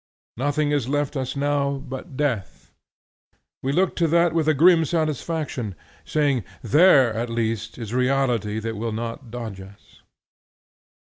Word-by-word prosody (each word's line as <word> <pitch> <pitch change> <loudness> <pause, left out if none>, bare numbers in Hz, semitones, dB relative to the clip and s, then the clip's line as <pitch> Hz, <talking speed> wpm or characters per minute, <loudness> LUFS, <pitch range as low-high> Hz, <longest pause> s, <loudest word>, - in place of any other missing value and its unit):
Nothing 145 +4 0
is 145 -5 0
left 145 0 -1
us 130 -1 -3
now 140 0 0
but 135 +1 -8
death. 125 -10 -2 0.9
We 135 - -1
look 185 +5 +1
to 170 - +3
that 170 +1 +3
with 160 -2 +1
a 155 - +4
grim 165 +3 +6
satisfaction, 155 - -2 0.3
saying 140 -6 +1 0.2
There 135 - +5
at 115 +2 -3
least 115 -1 -2
is 115 -2 -6
reality 125 -5 +1
that 110 0 -4
will 115 +1 -3
not 115 +3 -5
dodge 110 -5 -6
us. 100 +1 -16
135 Hz, 140 wpm, -23 LUFS, 115-150 Hz, 0.9 s, grim